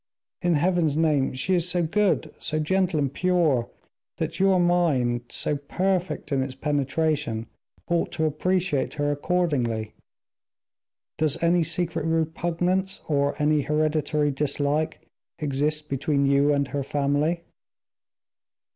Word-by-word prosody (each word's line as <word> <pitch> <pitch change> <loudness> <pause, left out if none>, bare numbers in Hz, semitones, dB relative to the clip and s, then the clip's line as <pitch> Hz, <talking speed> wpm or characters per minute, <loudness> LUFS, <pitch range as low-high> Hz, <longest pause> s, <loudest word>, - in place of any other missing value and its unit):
In 175 -3 +2
Heaven's 165 -2 +1
name, 150 -4 +2
she 130 +9 -1
is 180 -1 +2
so 175 -1 +1
good, 180 -2 +1
so 155 - -2
gentle 180 +1 +1
and 140 -2 -1
pure, 165 -10 +1 0.5
that 170 - -3
your 190 -1 +4
mind, 145 -9 +2
so 150 - -1
perfect 180 +5 -2
in 135 -1 +2
its 130 0 -4
penetration, 145 -4 -1 0.4
ought 170 -1 0
to 160 - 0
appreciate 170 0 0
her 145 -1 0
accordingly. 140 -9 -1 1.3
Does 155 -2 +2
any 170 +1 +4
secret 165 0 -1
repugnance, 170 +4 -1
or 140 -2 +1
any 150 0 +3
hereditary 150 0 +1
dislike, 145 +2 -1 0.3
exist 150 +1 -1
between 140 0 0
you 140 +1 +3
and 140 -1 +1
her 145 - -2
family?" 145 +5 0
155 Hz, 120 wpm, -25 LUFS, 140-175 Hz, 1.3 s, your